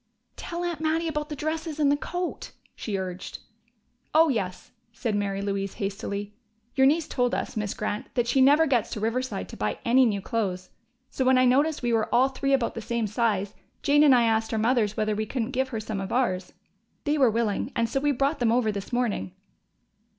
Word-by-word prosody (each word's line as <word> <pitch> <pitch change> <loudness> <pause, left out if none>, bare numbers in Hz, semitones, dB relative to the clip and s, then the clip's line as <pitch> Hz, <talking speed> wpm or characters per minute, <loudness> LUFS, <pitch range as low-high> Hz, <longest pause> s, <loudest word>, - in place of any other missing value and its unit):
"Tell 345 0 -5
Aunt 345 -3 -3
Mattie 320 +1 0
about 300 -1 -3
the 300 - -4
dresses 310 +1 -3
and 285 -2 +4
the - - +4
coat," 355 +4 -5 0.2
she 205 -3 -3
urged. 185 -1 -5 0.8
"Oh, 320 0 +6
yes," 190 -8 -3 0.2
said 230 -1 -3
Mary 200 -1 -1
Louise 195 -1 -2
hastily. 200 +1 -4 0.4
"Your 265 0 +5
niece 310 +2 +2
told 245 -1 0
us, - - -4
Miss 210 -2 -2
Grant, 210 0 -3
that 240 -2 +2
she 260 +3 +3
never 290 +4 +6
gets 250 -7 +1
to - - -5
Riverside 225 - -2
to - - -9
buy 105 0 -1
any 255 +2 +5
new 205 -3 0
clothes, 190 -3 -3 0.4
so 265 - -1
when 260 0 +4
I 255 - +5
noticed 285 +4 +2
we 240 -1 +1
were 225 -1 +1
all 260 +3 +4
three 275 +1 -2
about 265 -4 +2
the 230 - -5
same 230 +1 -1
size, 210 -2 0 0.3
Jane 290 +1 +4
and 285 -4 +7
I 240 - +4
asked 225 -1 +1
our 225 - 0
mothers 220 -2 +1
whether 215 0 +1
we 215 +1 -2
couldn't 245 0 -2
give 265 0 0
her 225 -4 -3
some 215 -2 -4
of 195 - -5
ours. 190 -8 0 0.5
They 295 0 0
were 260 -3 +6
willing, 225 +2 -1
and 230 0 +1
so 270 - -1
we 290 +1 +2
brought 280 +3 0
them 235 -2 +2
over 235 -2 +2
this 200 -1 -6
morning." 235 - -1
235 Hz, 210 wpm, -26 LUFS, 210-275 Hz, 0.8 s, and